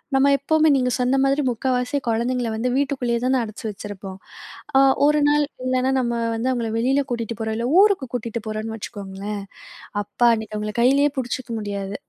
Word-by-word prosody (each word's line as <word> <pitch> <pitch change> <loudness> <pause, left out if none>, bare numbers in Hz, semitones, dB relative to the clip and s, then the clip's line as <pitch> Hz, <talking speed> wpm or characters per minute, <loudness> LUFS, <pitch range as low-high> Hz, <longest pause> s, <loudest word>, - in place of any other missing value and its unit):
நம்ம 270 +1 +4
எப்பவுமே 315 +3 +2
நீங்க 250 -2 +1
சொன்ன 250 +2 +2
மாதிரி 275 +2 +2
முக்காவாசி 250 +3 -1
குழந்தைங்கள 235 +1 0
வந்து 240 +3 -1
வீட்டுக்குள்ளயே 260 -4 0
தான 260 0 +2
அடச்சி 215 +2 -8
வச்சிருப்போம். 195 -2 -8 0.6
அ - - +7 0.3
ஒரு 300 0 +3
நாள் 295 0 +3 0.2
இல்லனா 255 0 +1
நம்ம 235 -2 0 0.2
வந்து 235 +3 -1
அவுங்கள 235 -3 -1
வெளில 265 +5 +2
கூட்டிட்டு 230 -2 -3
போறோம், 220 0 -2
இல்ல 235 +1 -1
ஊருக்கு 400 -10 +3
கூட்டிட்டு 235 -1 -3
போறோம்ன்னு 215 +1 -4
வச்சுக்கோங்களேன், 200 0 -6 0.6
அப்பா! 220 +4 +2
அன்னைக்கு 215 -1 -6
அவுங்கள 210 0 -4
கைலயே 280 +4 +4
புடிச்சுக்க 245 0 -3
முடியாது. 200 -1 -4
240 Hz, 165 wpm, -22 LUFS, 215-265 Hz, 0.6 s, அ